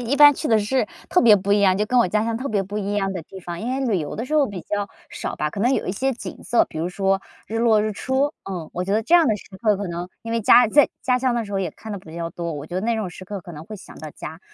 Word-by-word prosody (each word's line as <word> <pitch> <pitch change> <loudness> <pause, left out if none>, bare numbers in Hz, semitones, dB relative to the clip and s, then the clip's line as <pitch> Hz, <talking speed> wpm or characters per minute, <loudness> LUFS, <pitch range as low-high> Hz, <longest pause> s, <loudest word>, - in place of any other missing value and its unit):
一 245 +4 -1
般 290 0 +9
去 300 - -4
的 225 -2 +5
是 240 +6 0 0.2
特 360 - +4
别 220 -3 +7
不 200 +1 0
一 205 - +4
样 190 -2 +4
就 210 - +1
跟 250 +3 +2
我 235 - +4
家 210 +3 +1
乡 230 0 -1
特 275 - -3
别 205 -3 +1
不 205 +2 -5
一 205 0 -2
样 195 -1 0
的 185 - -4
地 190 +4 -11
方， 175 -1 -6
因 235 +3 -3
为 265 +1 -1
旅 215 -6 +1
游 150 -3 -5
的 230 - -3
时 255 - -8
候 295 -3 +4
比 190 -4 -7
较 205 -1 -2 0.2
少 - - -5
吧， 150 0 -1
可 200 - -5
能 245 +5 +3
有 - - -2
一 - - -1
些 265 +7 0
景 235 - -8
色， 240 - +3
比 155 - -8
如 170 +2 -1
说 195 +1 0 0.3
日 225 - -3
落 225 -2 +4
日 215 0 -1
出， 265 +7 0
呃， 175 -5 -6
我 180 - -2
觉 190 +2 -2
得 220 - +2
这 335 - +2
样 340 -2 +6
的 215 - +2
时 - - -13 0.2
刻 215 -3 +3
可 200 0 -4
能 175 +1 -5
因 230 - -5
为 230 - +1
家 240 +3 +7
在 290 +5 +5
家 250 -1 +2
乡 255 -1 +1
的 235 -2 -1
时 205 - -9
候 195 - 0
也 185 -4 -2
看 220 +7 -9
得 200 - -4
比 165 -3 -13
较 170 0 -3
多， 170 -1 -4
我 145 -1 -6
觉 175 - -8
得 185 - 0
那 230 +3 0
种 210 -5 -3
时 185 +2 -11
刻 205 0 -5
可 175 - -10
能 150 -1 -8
会 215 - -7
想 - - -13
到 155 - -7
家。 160 +3 -8
205 Hz, 360 characters per minute, -22 LUFS, 185-235 Hz, 0.3 s, 般